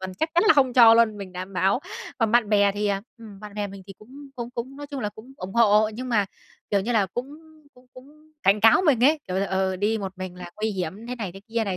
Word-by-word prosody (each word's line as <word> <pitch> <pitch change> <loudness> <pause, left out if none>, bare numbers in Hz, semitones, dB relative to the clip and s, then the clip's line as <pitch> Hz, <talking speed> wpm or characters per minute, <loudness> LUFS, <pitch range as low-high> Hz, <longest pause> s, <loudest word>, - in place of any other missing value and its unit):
tuần 190 0 -6
chắc 315 - -1
chắn 345 - +4
là 425 - +6
không 265 -3 +3
cho 230 -2 +8
luôn, 230 -2 +3
mình 195 -2 -8
đảm 185 +2 -7
bảo. 195 +5 +1 0.4
Còn 225 -3 +1
bạn 240 -3 +3
bè 205 -1 +3
thì, 205 +1 -2
à, 200 -1 -1 0.2
ừm, 210 -4 -12
bạn 210 -1 -10
bè 210 -1 -2
mình 195 -1 -11
thì 195 - -9
cũng 275 +6 -13
cũng 240 -1 -5
cũng 245 +3 -6
nói 290 0 -8
chung 280 -1 -6
là 210 - -2
cũng 220 +5 -14
ủng 190 -6 -8
hộ, 215 -2 +4
nhưng 255 +3 -6
mà, 210 -5 +1 0.4
kiểu 200 - +2
như 225 +5 -2
là, 210 -4 +2
cũng 245 +8 -5 0.5
cũng 250 0 -21
cũng 305 +4 -17
cảnh 200 +2 +3
cáo 225 - +6
mình 250 -5 +4
ấy, 305 +3 +4
kiểu 185 - -2
là, 195 +1 0
ờ, 190 0 -1
đi 210 +4 0
một 195 -2 -5
mình 185 -1 -6
là 175 -1 -9
nguy 220 +1 -1
hiểm 190 +3 -5
thế 250 +1 -5
này 205 -7 -5
thế 195 - -12
kia 225 0 -1
này, 195 -3 -3
215 Hz, 280 wpm, -24 LUFS, 195-245 Hz, 0.5 s, cho